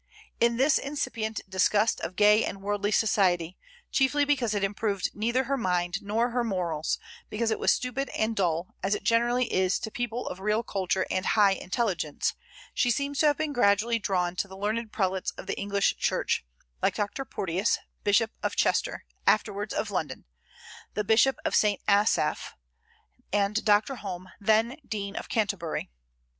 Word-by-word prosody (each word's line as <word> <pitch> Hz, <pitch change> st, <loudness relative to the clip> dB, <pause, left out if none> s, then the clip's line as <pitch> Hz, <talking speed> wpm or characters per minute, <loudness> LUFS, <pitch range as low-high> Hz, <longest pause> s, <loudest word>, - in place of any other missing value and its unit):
In 235 Hz, 0 st, +3 dB
this 270 Hz, +3 st, +4 dB
incipient 225 Hz, -6 st, -3 dB
disgust 205 Hz, +4 st, +2 dB
of 180 Hz, -, -5 dB
gay 210 Hz, +2 st, +5 dB
and 195 Hz, 0 st, -5 dB
worldly 205 Hz, 0 st, 0 dB
society 185 Hz, -5 st, +2 dB, 0.4 s
chiefly 285 Hz, +2 st, +3 dB
because 255 Hz, -7 st, +1 dB
it 200 Hz, -, -1 dB
improved 200 Hz, -1 st, -1 dB
neither 235 Hz, +5 st, 0 dB
her 275 Hz, +2 st, -1 dB
mind 180 Hz, -3 st, -1 dB
nor 225 Hz, +4 st, 0 dB
her 245 Hz, 0 st, 0 dB
morals, 175 Hz, -8 st, -1 dB, 0.3 s
because 225 Hz, +1 st, -1 dB
it 220 Hz, -, -1 dB
was -, -, +3 dB
stupid 250 Hz, +2 st, -1 dB
and 220 Hz, +1 st, -1 dB
dull, 170 Hz, -3 st, -1 dB
as 195 Hz, +2 st, +1 dB
it -, -, -6 dB
generally 240 Hz, +2 st, +2 dB
is 185 Hz, 0 st, +2 dB
to 220 Hz, -, -6 dB
people 245 Hz, +1 st, -3 dB
of 180 Hz, -, -5 dB
real 210 Hz, +3 st, 0 dB
culture 190 Hz, -3 st, -1 dB
and 185 Hz, 0 st, -1 dB
high 205 Hz, -2 st, +6 dB
intelligence 190 Hz, -5 st, -1 dB, 0.4 s
she 245 Hz, -, +2 dB
seems 280 Hz, +3 st, -1 dB
to 310 Hz, -, +5 dB
have 290 Hz, -, +3 dB
been 310 Hz, -2 st, -2 dB
gradually 230 Hz, 0 st, +3 dB
drawn 180 Hz, -4 st, 0 dB
to 200 Hz, -, -1 dB
the 190 Hz, 0 st, -11 dB
learned 215 Hz, +2 st, -2 dB
prelates 190 Hz, -3 st, -1 dB
of -, -, -8 dB
the -, -, -3 dB
English 200 Hz, 0 st, +1 dB
Church, -, -, 0 dB, 0.4 s
like -, -, +1 dB
Dr. 205 Hz, +6 st, -2 dB
Porteus, 190 Hz, -4 st, -1 dB, 0.3 s
Bishop 210 Hz, +2 st, +3 dB
of -, -, -2 dB
Chester, -, -, 0 dB, 0.2 s
afterwards 205 Hz, -1 st, +1 dB
of 210 Hz, -, -2 dB
London; 155 Hz, -8 st, -3 dB, 0.7 s
the 210 Hz, -, 0 dB
Bishop 225 Hz, +6 st, +4 dB
of 315 Hz, -, 0 dB
St. 210 Hz, -2 st, +3 dB
Asaph; 200 Hz, -6 st, +2 dB, 0.8 s
and 205 Hz, +1 st, +1 dB
Dr. 215 Hz, +5 st, +3 dB
Home, 185 Hz, -3 st, -7 dB
then 220 Hz, +5 st, +2 dB
Dean 200 Hz, -3 st, -5 dB
of -, -, -6 dB
Canterbury. 200 Hz, -, -2 dB
210 Hz, 165 wpm, -27 LUFS, 195-235 Hz, 0.8 s, high